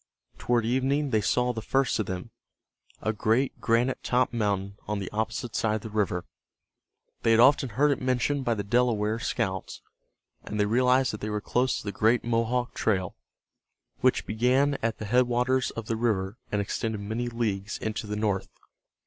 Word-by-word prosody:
Toward 120 -2 +1
evening 135 +4 +1
they 110 -2 +3
saw 125 +4 +1
the 110 - -4
first 135 +2 +1
of 105 - -1
them, 90 -1 -5 0.7
a 110 - 0
great 115 +5 0
granite 120 +3 +1
topped 125 0 +1
mountain 100 -3 -1
on 105 - -1
the 100 -2 -5
opposite 110 +2 -3
side 110 -1 +1
of 110 - -3
the 110 - -7
river. 100 -4 -1 1.0
They - - +1
had 115 0 +5
often 135 +1 +5
heard 145 +7 +2
it 140 - -1
mentioned 130 +2 0
by 120 -2 +1
the 100 - -3
Delaware 110 -1 +1
scouts, 95 -4 -3 0.6
and 105 - -5
they 105 - +4
realized 125 +3 +3
that 105 - -6
they 110 - -3
were 105 0 -1
close 125 +4 0
to - - -7
the 100 - -3
great 115 +4 +2
Mohawk 120 +1 0
trail, 95 -5 0 0.8
which - - +2
began 125 +6 +2
at 115 0 -1
the 105 - -6
headwaters 125 +3 +2
of 115 - -6
the 115 - -1
river 110 -2 -1
and 105 - +1
extended 110 +1 -3
many 110 +4 -3
leagues 110 -3 -2
into 110 0 -4
the 105 - -3
north. 105 -3 -1
115 Hz, 180 wpm, -27 LUFS, 105-125 Hz, 1.0 s, had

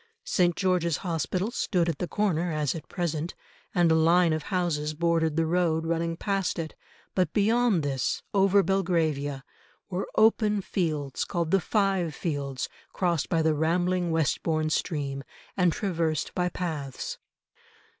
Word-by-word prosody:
St. 175 -2 +2
George's 180 -5 +1
Hospital 180 +5 -1
stood 180 -8 0
at 165 -4 -2
the 180 - -2
corner 180 -5 0
as 150 -3 0
at 165 - -8
present, 170 -2 -2 0.4
and 175 -2 +4
a - - +6
line 165 +1 +4
of 155 - -1
houses 160 -5 -1
bordered 165 -1 +1
the 165 0 +2
road 165 -1 +1
running 165 0 -1
past 195 -1 -1
it, 160 -2 -4 0.4
but 180 -4 +1
beyond 220 -3 +3
this, 135 -3 -1
over 195 0 +4
Belgravia, 160 -8 0 0.5
were 185 +1 -2
open 215 -1 +4
fields 155 -8 -2
called 170 -2 -2
the 195 - +4
Five 195 -5 +1
Fields 140 -5 -3 0.3
crossed 175 -5 0
by 165 -2 +2
the 160 0 +3
rambling 175 +3 +1
Westbourne 155 0 0
stream, 140 -5 -2 0.3
and 180 -3 +3
traversed 165 -8 -1
by 180 -1 0
paths. 155 -8 -4
170 Hz, 145 wpm, -27 LUFS, 155-185 Hz, 0.5 s, a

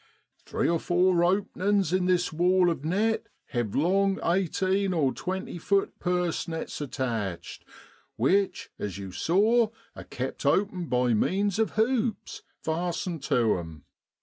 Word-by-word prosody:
' - - -39
Three - - 0
or 170 0 +2
four 175 0 +2
openin's 195 0 +1
in 185 -1 +2
this 180 -2 +1
wall 180 +2 +3
of 155 -4 -5
net 215 +7 0 0.2
have 120 -7 -2
long 195 +5 +2
eighteen 190 +2 +1
or 140 -5 +2
twenty 185 -1 -4
feet 200 +4 0
purse 180 -2 -1
nets 160 -2 -5
attached, 115 -10 -4 0.5
which, 190 - +1
as 100 -2 -4
you 95 -2 -7
saw, 215 - +3 0.3
are - - -8
kept - - -5
open 190 -4 +1
by 125 -2 +2
means 195 - +1
of 220 - +1
hoops, 225 0 0 0.2
fastened 170 0 -2
to 115 -6 +2
'em. 80 -4 -9
180 Hz, 140 wpm, -27 LUFS, 145-195 Hz, 0.5 s, wall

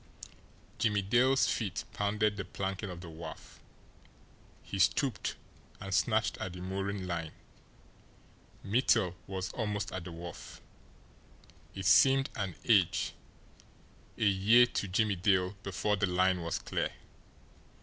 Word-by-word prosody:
Jimmie 105 -2 +2
Dale's 125 +5 +3
feet 100 -6 -2
pounded 105 0 0
the 100 - -4
planking 95 +2 -4
of 90 -1 -7
the 85 - -9
wharf. 80 +1 -10 1.0
He 100 - -5
stooped 120 +7 +1 0.4
and 95 0 -5
snatched 90 - +1
at 90 - -4
the 90 - -8
mooring 95 +1 -3
line. 85 -3 -4 1.3
Mittel 110 -4 +2
was 95 -1 -4
almost 105 -3 -2
at 95 -2 -5
the 90 - -7
wharf. 85 0 -9 1.2
It 95 -1 -5
seemed 135 +8 +5
an 95 -5 -3
age, 95 -7 +3 1.0
a - - 0
year 105 +5 +6
to 120 -4 -3
Jimmie 100 +1 +1
Dale 95 +1 +2
before 105 +2 -1
the 100 - +1
line 90 0 +2
was 85 0 -2
clear. - - -2
95 Hz, 125 wpm, -31 LUFS, 90-105 Hz, 1.3 s, year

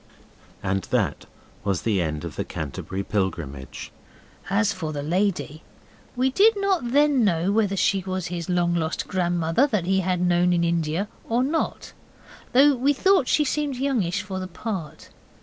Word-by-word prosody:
And 95 0 0
that - - -1 0.4
was 95 -3 -1
the 105 -5 +1
end 75 -2 -3
of - - -7
the - - -2
Canterbury 80 +6 -5
Pilgrimage. 80 - -4 0.6
As 205 +2 +2
for 165 -5 -4
the 145 -2 -4
lady, 170 -2 -1 0.5
we 260 +2 +1
did 410 +7 +4
not 380 -11 0
then 285 -2 +4
know 180 -1 +2
whether 205 -2 +1
she 195 0 +2
was 185 -2 -3
his 170 -1 -4
long 175 -1 +2
lost 160 -2 -2
grandmother 175 - +1
that 210 -10 -1
he 190 +1 +2
had 185 -1 0
known 180 0 +3
in 170 -1 +2
India 170 +3 0 0.2
or 235 +2 +2
not, 310 +5 -2 0.6
though 275 +3 +6
we 270 +4 +2
thought 375 -1 +3
she 300 - +3
seemed 290 0 -1
youngish 225 -8 0
for 190 -2 -5
the 185 - -4
part. 185 -4 -6
185 Hz, 165 wpm, -24 LUFS, 160-245 Hz, 0.6 s, though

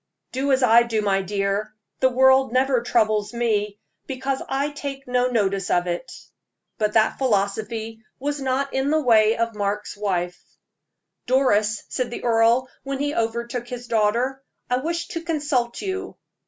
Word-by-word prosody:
"Do 270 +2 -1
as 260 0 +3
I 235 -1 +7
do, 225 -2 -1
my 195 -1 +2
dear; 200 +2 -2 0.2
the 260 - +4
world 265 0 +4
never 255 0 +2
troubles 215 -2 +1
me, 210 -3 0 0.3
because 265 0 -2
I 275 +2 0
take 280 -2 -6
no 250 0 +2
notice 195 -5 0
of 175 0 +2
it." 175 +7 -4 0.7
But 210 -1 +1
that 220 -1 +2
philosophy 220 -1 -1 0.2
was 285 +1 -3
not 270 +1 -1
in 265 +1 0
the 310 +1 +3
way 225 -5 +4
of 230 0 -1
Mark's 205 0 -3
wife. 180 -4 -2 0.9
"Doris," 215 -5 +2
said 255 -2 -2
the 240 - -7
earl, 235 +2 +3
when 275 0 -4
he 290 +1 -1
overtook 235 +1 -2
his 245 0 -7
daughter, 235 +4 0 0.3
"I 250 - +3
wish 335 +5 -2
to 330 - -4
consult 290 -7 -1
you." 380 -1 -4
235 Hz, 155 wpm, -23 LUFS, 215-265 Hz, 0.9 s, I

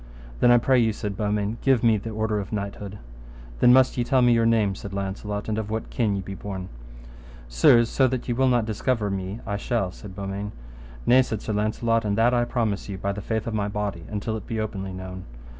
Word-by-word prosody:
Then, - - +5
I 120 - +7
pray 130 +2 +3
you, 110 -2 +2
said 105 -1 -4
Beaumains, 105 +1 -1
give 135 -4 +3
me 115 -2 +5
the 105 +2 -4
order 110 -1 -1
of 100 - -6
knighthood. 100 -1 -5 0.6
Then 125 - +6
must 130 0 +5
ye - - +2
tell 130 +1 +3
me 120 -1 +5
your 115 -1 +3
name, 110 -4 +3
said 100 0 -8
Launcelot, 100 +1 -4
and 110 0 -1
of 110 -1 -4
what 110 +1 -4
kin 110 -4 +1
ye 95 - -3
be 95 - -6
born. 95 -1 -6 0.8
Sir, - - +5
so 130 +3 +2
that 130 -1 -3
ye 120 - 0
will 130 +2 +2
not 120 -3 +3
discover 110 -1 -1
me 95 +3 -4
I 100 -2 -2
shall, 100 -3 -1
said 95 0 -11
Beaumains. 100 +1 -5 0.5
Nay, 130 +1 +6
said 110 -5 -3
Sir 110 - -2
Launcelot, 115 +2 +1
and 105 -1 -1
that 120 +2 +4
I 120 -1 +2
promise 110 -5 -2
you 100 - -4
by 100 +1 -2
the 100 +1 -5
faith 110 +1 -2
of 115 - -3
my 105 -2 0
body, 100 -4 -3
until 105 +1 -3
it - - -10
be 115 -3 -3
openly 100 -3 -4
known. 95 0 -7
105 Hz, 230 wpm, -25 LUFS, 100-115 Hz, 0.8 s, I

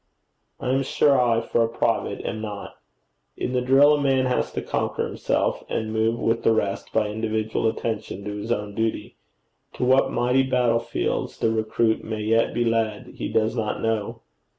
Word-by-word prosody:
I 125 - -1
am 135 +1 +2
sure 135 0 +3
I, 115 -2 +2
for 115 0 +1
a - - +1
private, - - -1
am 110 - -3
not. 105 -2 -7 0.6
In 125 - -3
the 125 - +1
drill 135 +4 +6
a 145 - +1
man 135 -2 +2
has 125 -1 0
to - - -2
conquer - - -1
himself, - - -1
and 110 0 -2
move 110 +1 +1
with 115 0 +1
the 115 - +3
rest 100 -3 -2
by 110 -1 +1
individual 110 +1 -1
attention 110 -3 -4
to 105 - -3
his 105 +3 -5
own 105 -3 -2
duty: 110 +1 -2 0.6
to - - -4
what 130 +2 +4
mighty 125 +2 +2
battlefields 120 -3 0
the 110 - +1
recruit 110 0 0
may 110 -1 -4
yet 115 +2 +2
be 120 - 0
led, 115 -2 -1
he - - -3
does 110 +1 +1
not 110 -3 -2
know. 110 -2 -2
115 Hz, 180 wpm, -24 LUFS, 110-125 Hz, 0.6 s, drill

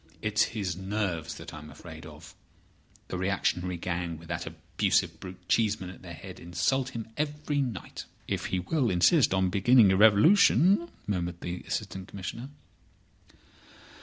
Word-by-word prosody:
It's 110 0 +2
his 95 -5 -2
nerves 95 -4 -3
that - - -9
I 75 - -7
am 75 +1 -11
afraid 80 +1 -11
of. 80 +1 -13 0.8
The 90 - -3
reactionary 90 -1 0
gang, 85 -1 -3
with 80 +1 -14
that - - -3
abusive - - 0
brute 90 -1 -10
Cheeseman 105 -4 +1
at 90 - -14
their - - -9
head, - - -10
insult 90 +10 0
him 115 -1 -5
every 150 -1 -1
night." 120 -10 -5 0.2
"If - - -2
he 95 - -1
will 130 - 0
insist 105 - +4
on 95 -1 +2
beginning 105 +1 +5
a - - +3
revolution!" 170 - +5 0.2
murmured 90 -3 -3
the 90 0 -4
Assistant 95 0 -4
Commissioner. 100 +7 -6
95 Hz, 150 wpm, -28 LUFS, 90-115 Hz, 0.8 s, beginning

